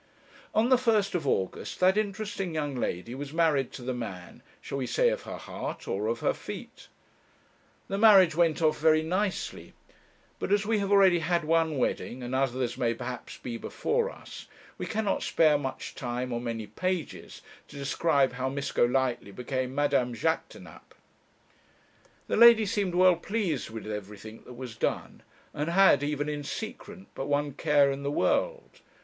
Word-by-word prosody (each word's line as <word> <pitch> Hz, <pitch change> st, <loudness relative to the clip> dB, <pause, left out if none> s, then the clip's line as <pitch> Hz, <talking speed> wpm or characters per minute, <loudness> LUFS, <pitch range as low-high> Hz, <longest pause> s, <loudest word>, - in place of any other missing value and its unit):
On 225 Hz, +3 st, +3 dB
the 255 Hz, -2 st, +5 dB
first 215 Hz, -5 st, +2 dB
of 165 Hz, -6 st, -2 dB
August 95 Hz, -7 st, -2 dB
that 185 Hz, +1 st, +4 dB
interesting 205 Hz, -4 st, -2 dB
young 145 Hz, -3 st, -2 dB
lady 115 Hz, -2 st, -3 dB
was 140 Hz, +2 st, -6 dB
married 155 Hz, -6 st, +2 dB
to 125 Hz, -, -8 dB
the 130 Hz, +1 st, -2 dB
man 100 Hz, -7 st, -7 dB, 0.2 s
shall 140 Hz, -, -5 dB
we 130 Hz, -, -2 dB
say -, -, +3 dB
of -, -, -2 dB
her -, -, -5 dB
heart -, -, -7 dB
or 105 Hz, +3 st, -2 dB
of 115 Hz, +1 st, -2 dB
her -, -, +2 dB
feet? -, -, -9 dB, 1.0 s
The 195 Hz, -, -3 dB
marriage 195 Hz, -6 st, +7 dB
went 165 Hz, 0 st, +2 dB
off 155 Hz, -1 st, +2 dB
very 155 Hz, 0 st, +4 dB
nicely, 185 Hz, +4 st, -3 dB, 0.7 s
but -, -, -3 dB
as 205 Hz, 0 st, +3 dB
we 220 Hz, 0 st, +1 dB
have 200 Hz, 0 st, -2 dB
already 190 Hz, -3 st, +6 dB
had 170 Hz, +1 st, 0 dB
one 160 Hz, -1 st, +1 dB
wedding, 125 Hz, 0 st, -2 dB
and 120 Hz, +1 st, -5 dB
as 130 Hz, -1 st, +1 dB
others 125 Hz, -2 st, -2 dB
may 115 Hz, -1 st, +1 dB
perhaps 125 Hz, +2 st, -7 dB
be 120 Hz, -2 st, -6 dB
before 470 Hz, -, -1 dB
us, -, -, -11 dB, 0.3 s
we -, -, -4 dB
cannot 215 Hz, -2 st, -1 dB
spare 155 Hz, -2 st, +3 dB
much 135 Hz, -2 st, -5 dB
time 125 Hz, 0 st, -4 dB
or 120 Hz, -, -2 dB
many 115 Hz, -2 st, -4 dB
pages 185 Hz, -, -4 dB, 0.2 s
to -, -, -14 dB
describe 140 Hz, -1 st, +1 dB
how 130 Hz, +1 st, -2 dB
Miss 140 Hz, +1 st, -3 dB
Golightly 125 Hz, -3 st, +1 dB
became 130 Hz, +4 st, -4 dB
Madame 140 Hz, -4 st, +1 dB
Jaquêtanàpe. 160 Hz, +8 st, -4 dB, 1.3 s
The -, -, -1 dB
lady 230 Hz, -1 st, +8 dB
seemed 200 Hz, -4 st, -1 dB
well 180 Hz, -1 st, +5 dB
pleased 185 Hz, -, -2 dB
with 110 Hz, -1 st, -8 dB
everything 105 Hz, +1 st, -7 dB
that 125 Hz, -, -9 dB
was 125 Hz, -2 st, -8 dB
done, -, -, -3 dB, 0.3 s
and 150 Hz, +2 st, -2 dB
had 175 Hz, -5 st, +5 dB
even 145 Hz, 0 st, -2 dB
in 150 Hz, -1 st, -3 dB
secret 210 Hz, -, -7 dB
but 135 Hz, -, -5 dB
one 145 Hz, 0 st, 0 dB
care 145 Hz, -2 st, +3 dB
in 135 Hz, 0 st, -4 dB
the 140 Hz, -, -2 dB
world. -, -, -1 dB
145 Hz, 170 wpm, -28 LUFS, 125-185 Hz, 1.3 s, lady